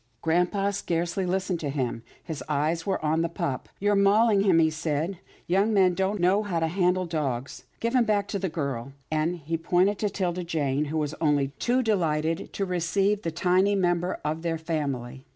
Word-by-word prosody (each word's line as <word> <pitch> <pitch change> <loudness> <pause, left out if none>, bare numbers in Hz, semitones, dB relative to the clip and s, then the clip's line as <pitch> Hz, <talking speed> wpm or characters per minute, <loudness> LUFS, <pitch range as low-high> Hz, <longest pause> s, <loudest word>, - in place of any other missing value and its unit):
Grampa 180 +5 +1
scarcely 175 0 -1
listened 185 -1 -1
to 150 - -3
him. 130 -5 -2 0.2
His 160 -4 -6
eyes 155 +4 0
were 195 - 0
on 160 +2 +2
the 170 - 0
pup. 140 -5 -3
" - - -40
You're 205 +1 +2
mauling 200 +1 +4
him," 190 -4 +4
he 160 -1 +4
said. 155 +3 -2
" - - -29
Young 195 +5 +2
men 185 -2 +5
don't 195 +3 -1
know 185 +4 +3
how 190 -6 -2
to 165 - +1
handle 180 +1 +1
dogs. 140 -6 -3
Give 230 +1 -1
him 250 -2 +5
back 205 -3 +1
to 200 - -2
the 190 -1 -1
girl," 140 -5 -4 0.2
and 155 +3 +1
he 165 0 -3
pointed 185 +4 +2
to 210 - 0
'Tilda 180 -2 -2
Jane, 150 -4 0
who 155 +2 -3
was 150 -1 -1
only 145 -3 +2
too 255 +2 +2
delighted 165 -7 0
to 195 - -1
receive 195 +3 +1
the 170 - -2
tiny 185 +4 +2
new 195 - +1
member 175 0 0
of 155 +2 -1
their 165 -1 -1
family. 140 -6 -4
170 Hz, 205 wpm, -26 LUFS, 155-195 Hz, 0.2 s, men